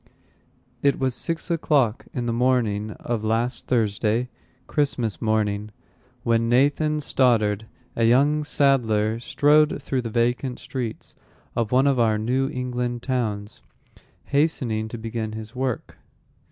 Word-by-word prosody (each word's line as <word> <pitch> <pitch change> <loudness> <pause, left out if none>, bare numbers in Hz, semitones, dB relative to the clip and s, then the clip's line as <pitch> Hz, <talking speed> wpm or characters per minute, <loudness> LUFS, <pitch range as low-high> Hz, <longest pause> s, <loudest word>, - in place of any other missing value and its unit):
It 140 0 +3
was 130 -2 0
six 165 +6 -3
o'clock 140 -8 +1
in 120 - -3
the 115 - -1
morning 115 -4 +1
of 115 -3 -4
last 115 +3 -1
Thursday 115 +1 +1 0.4
(Christmas 125 -8 -1
morning), 105 -1 0 0.5
when 115 0 +2
Nathan 145 +5 +2
Stoddard, 110 -7 +1 0.3
a 115 - 0
young 145 +6 +4
saddler, 115 -7 +2
strode 150 +4 +3
through 135 -2 -2
the 115 - -5
vacant 120 +3 0
streets 125 -4 -6 0.4
of 115 -2 -1
one 130 +2 +4
of 140 -3 +3
our 110 -2 +3
New 130 +5 0
England 125 -2 -3
towns, 110 -6 -2 0.6
hastening 130 -7 0
to 120 - -6
begin 110 -1 -4
his 110 +1 -8
work. 130 -2 -3
120 Hz, 125 wpm, -24 LUFS, 110-135 Hz, 0.6 s, young